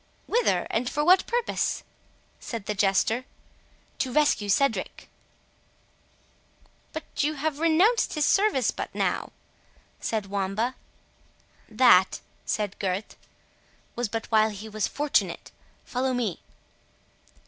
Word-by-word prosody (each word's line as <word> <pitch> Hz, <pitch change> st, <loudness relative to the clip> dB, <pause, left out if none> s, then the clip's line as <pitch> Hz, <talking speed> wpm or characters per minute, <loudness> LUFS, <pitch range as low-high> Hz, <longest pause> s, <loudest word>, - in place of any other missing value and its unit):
"Whither?—and 250 Hz, -, +1 dB
for 295 Hz, +1 st, -1 dB
what 365 Hz, +2 st, +5 dB
purpose?" 480 Hz, 0 st, -1 dB, 0.6 s
said 230 Hz, -4 st, -6 dB
the 210 Hz, -, -1 dB
Jester. 205 Hz, +4 st, +2 dB, 0.8 s
"To 260 Hz, -, -1 dB
rescue 270 Hz, -7 st, +2 dB
Cedric." 215 Hz, -2 st, 0 dB, 1.8 s
"But 315 Hz, -, -5 dB, 0.2 s
you 305 Hz, +1 st, 0 dB
have 295 Hz, 0 st, -2 dB
renounced 340 Hz, +9 st, +3 dB
his 300 Hz, -1 st, +2 dB
service 395 Hz, -, +3 dB
but -, -, -5 dB
now," -, -, -1 dB, 0.7 s
said 220 Hz, -3 st, -2 dB
Wamba. 200 Hz, +5 st, -1 dB, 1.0 s
"That," 215 Hz, -5 st, +5 dB, 0.3 s
said 210 Hz, -2 st, -2 dB
Gurth, 195 Hz, +1 st, -3 dB, 0.8 s
"was 240 Hz, -3 st, -2 dB
but 225 Hz, +1 st, -3 dB
while 220 Hz, 0 st, +4 dB
he 210 Hz, +1 st, -8 dB
was 215 Hz, -1 st, -1 dB
fortunate—follow 265 Hz, -3 st, -2 dB
me!" 225 Hz, -8 st, -2 dB
240 Hz, 105 wpm, -26 LUFS, 210-295 Hz, 1.8 s, what